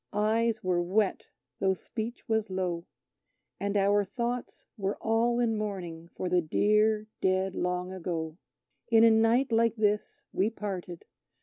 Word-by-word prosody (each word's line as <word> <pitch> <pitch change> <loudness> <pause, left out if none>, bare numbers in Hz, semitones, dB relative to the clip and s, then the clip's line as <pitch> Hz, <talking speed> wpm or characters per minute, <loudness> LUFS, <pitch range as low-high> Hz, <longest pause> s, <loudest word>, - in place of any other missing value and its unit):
Eyes 220 +2 +1
were 180 -1 +1
wet 195 +3 0 0.3
though 190 -1 +2
speech 225 +5 -6
was 220 -1 0
low, 180 -2 -2 0.7
And 200 +1 -1
our 200 +1 +3
thoughts 240 +4 -4
were 200 -3 -2
all 230 +2 +1
in 230 -2 +2
mourning 180 -6 -4
for 180 - -5
the 180 0 +3
dear, 210 +6 +2 0.2
dead 190 0 +1
Long 180 +1 -2
Ago! 165 -2 -4 0.5
In 225 -1 +6
a 230 - +7
night 225 +4 +3
like 230 0 +3
this 210 -1 0
we 200 +3 +2
parted. 190 -6 -6
205 Hz, 140 wpm, -29 LUFS, 185-225 Hz, 0.7 s, a